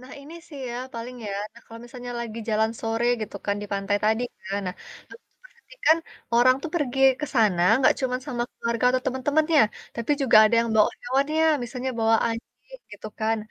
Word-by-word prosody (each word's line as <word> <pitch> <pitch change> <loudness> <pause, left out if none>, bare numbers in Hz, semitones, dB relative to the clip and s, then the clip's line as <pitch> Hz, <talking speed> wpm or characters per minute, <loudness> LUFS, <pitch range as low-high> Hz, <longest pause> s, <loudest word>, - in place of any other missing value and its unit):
Nah, 255 +2 -13
ini 295 +4 -12
sih 290 -4 -10
ya, 240 - -5 0.2
paling 230 +2 -6
ya, 200 - -4 0.2
nah, 235 - -16
kalau 230 0 -11
misalnya 245 0 -8
lagi 230 -1 -6
jalan 220 +1 +2
sore 225 +1 -1 0.2
gitu 210 -1 -5
kan, 200 - +1
dipantai 200 0 -1
tadi 220 +2 +2 0.2
kan, 195 +1 -3
nah, 180 - -3 0.4
aku - - -14
tuh - - -44
perhatikan 475 -8 0 0.4
orang 250 +2 +6
tuh 330 - -5
pergi 270 -5 -1 0.2
ke 300 - -2
sana 210 -8 +3 0.2
nggak 260 - +5
cuman 255 -1 -1
sama 245 -4 -2
keluarga 235 +1 -2
atau 255 0 0
temen-temennya. 290 +4 +2 0.3
Tapi 235 +3 -4
juga 255 -5 +5
ada 215 - +3
yang 235 - -1
bawa 210 - +5
hewannya, 280 +6 +1 0.2
misalnya 250 +2 -4
bawa 225 0 +4
anjing, 240 - -9
gitu - - -9
kan, 220 +1 +1
240 Hz, 190 wpm, -25 LUFS, 225-270 Hz, 0.4 s, orang